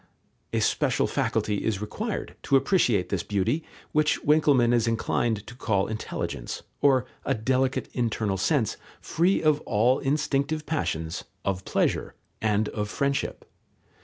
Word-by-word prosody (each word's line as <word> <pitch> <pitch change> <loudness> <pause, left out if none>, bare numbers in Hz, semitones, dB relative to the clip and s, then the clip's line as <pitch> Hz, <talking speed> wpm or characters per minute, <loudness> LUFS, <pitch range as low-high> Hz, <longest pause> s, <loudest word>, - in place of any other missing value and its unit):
A - - 0
special - - +2
faculty 105 -1 0
is 110 -3 0
required 210 - -4
to 140 - +3
appreciate 125 - +3
this 100 -4 0
beauty, 105 - 0 0.3
which 150 0 +2
Winckelmann 145 -5 +4
is 115 -1 +2
inclined 115 -1 0
to - - -10
call 105 -6 0
intelligence, 110 - -4 0.2
or 135 -3 +4 0.2
a 135 - 0
delicate 130 +4 0
internal 110 -5 0
sense, 120 - +1 0.2
free 180 +4 +1
of 155 -1 +3
all 120 +5 +2
instinctive 150 +1 0
passions, 80 - -2 0.2
of 95 -1 -1
pleasure, - - 0 0.3
and 105 -1 +2
of 105 -1 -3
friendship. 140 +4 -1
120 Hz, 135 wpm, -26 LUFS, 105-145 Hz, 0.3 s, Winckelmann